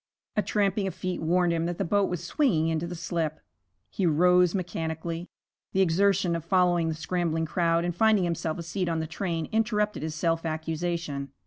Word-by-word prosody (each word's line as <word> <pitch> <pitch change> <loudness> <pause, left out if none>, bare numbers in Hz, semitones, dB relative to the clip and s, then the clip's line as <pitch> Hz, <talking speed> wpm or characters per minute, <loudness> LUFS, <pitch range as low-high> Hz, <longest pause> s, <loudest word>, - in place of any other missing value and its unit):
A 210 - +3
tramping 200 -1 0
of 185 - -5
feet 185 -1 -3
warned 175 +1 +2
him 165 0 0
that 175 -1 -3
the 195 - -1
boat 200 +3 +2
was 180 -1 -3
swinging 175 - +1
into 165 +1 -1
the 175 - -5
slip. 165 -2 -2 0.5
He 190 - 0
rose 180 +3 +4
mechanically. 165 -1 -3 0.5
The 190 - +3
exertion 190 0 +3
of 165 - -4
following 175 -1 +2
the 160 - -1
scrambling 165 0 -1
crowd 170 0 +1
and 175 -1 -2
finding 215 0 +4
himself 165 -2 -2
a 170 - -5
seat 180 +2 -2
on 165 -1 0
the 160 - -2
train 165 0 -3
interrupted 210 -4 0
his 155 0 -4
self 165 +1 0
accusation. 160 -3 -3
170 Hz, 190 wpm, -27 LUFS, 165-185 Hz, 0.5 s, rose